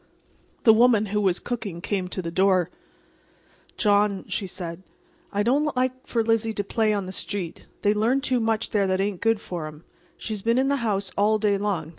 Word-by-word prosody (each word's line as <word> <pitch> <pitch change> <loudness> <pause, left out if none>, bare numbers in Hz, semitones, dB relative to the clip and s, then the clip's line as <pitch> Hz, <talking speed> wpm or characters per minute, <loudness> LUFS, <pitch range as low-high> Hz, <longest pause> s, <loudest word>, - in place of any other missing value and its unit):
The 220 - +8
woman 225 -2 +4
who 210 - +2
was 190 -3 +2
cooking 220 -8 -4
came 190 0 -2
to 185 0 -4
the 165 - -4
door. 185 -1 +2 1.1
"John," 205 -2 +2
she 195 - -3
said, 175 -1 -6 0.5
"I 205 0 0
don't 285 +4 +1
like 255 +1 -1
for 230 -2 +1
Lizzie 225 0 +1
to 205 - -2
play 220 +2 +1
in 200 -2 -1
the 185 - -6
street. 190 -3 -5 0.2
They 205 0 +4
learn 230 +6 +1
too 255 -2 +1
much 225 -1 0
there 200 -2 +2
that 185 0 0
ain't 195 -2 -1
good 225 -1 +2
for 170 -6 -5
'em. 155 +1 -11 0.3
She's 215 -2 -4
been 230 +3 +2
in 265 +1 +2
the 280 - +2
house 200 -6 -1
all 210 +2 +3
day 210 -1 +2
long. 190 -7 -2
205 Hz, 200 wpm, -25 LUFS, 190-225 Hz, 1.1 s, The